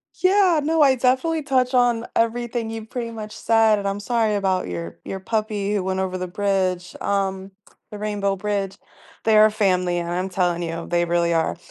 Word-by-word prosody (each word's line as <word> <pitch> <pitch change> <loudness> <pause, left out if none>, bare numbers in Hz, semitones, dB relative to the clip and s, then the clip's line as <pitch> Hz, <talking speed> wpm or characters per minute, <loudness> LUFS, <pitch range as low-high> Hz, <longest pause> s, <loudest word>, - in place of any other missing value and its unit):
Yeah, 370 -3 +3
no, 320 +1 +2
I 275 -3 +6
definitely 265 +6 +1
touch 255 -2 +1
on 245 -2 +2
everything 230 0 -1
you've 225 -1 -7
pretty 235 -2 -4
much 215 -2 -7
said, 225 -2 +3
and 200 - -3
I'm 195 +1 -2
sorry 220 0 0
about 190 -2 0
your 85 -1 -6
your 190 - -5
puppy 210 0 -2
who 200 -3 0
went 190 0 -2
over 185 -1 -2
the 185 0 -4
bridge, 185 -2 -1
um, 195 -1 -2 0.4
the 210 - -7
Rainbow 205 -2 -1
Bridge. 195 0 -3 0.5
They 220 -1 +4
are 215 0 +7
family, 185 -4 +1
and 170 0 -4
I'm 180 +2 -1
telling 175 -2 0
you, 165 0 -5
they 175 0 +2
really 170 0 +1
are. 165 0 0
205 Hz, 190 wpm, -22 LUFS, 185-230 Hz, 0.5 s, are